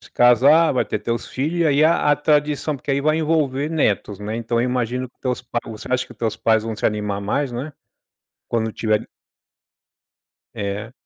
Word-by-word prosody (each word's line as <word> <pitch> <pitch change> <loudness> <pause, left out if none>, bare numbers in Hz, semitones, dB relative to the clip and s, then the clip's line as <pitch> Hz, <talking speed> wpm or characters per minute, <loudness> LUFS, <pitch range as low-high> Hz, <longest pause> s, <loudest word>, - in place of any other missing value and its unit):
se - - -16
casar, 135 +7 +5
vai 130 - +1
ter - - -3
teus 115 +2 -3
filho, 150 +6 -2
e - - +3
aí, 145 0 +3
a 160 -2 +3
a - - +5
tradição 150 0 +1
porque 135 +1 -3
aí 140 - +1
vai 155 +2 +2
envolver 150 -3 0
netos, 105 - 0
né. 105 +2 -4
Então 115 0 -1
eu 120 - +1
imagino 125 +1 -2
que - - -51
teus 125 -2 -2
pa 120 -1 -3
você 110 -2 -8
acha 125 0 +1
que - - -13
teus 110 -2 -2
pais 110 -1 +2
vão 110 -1 -4
se - - 0
animar 105 -1 -2
mais, 130 +7 -1
não 120 +4 -4
é? 155 - -10 0.8
Quando 110 -1 -1
tiverem 110 -1 0 1.5
É. 105 +2 -4
125 Hz, 200 wpm, -21 LUFS, 110-145 Hz, 1.5 s, casar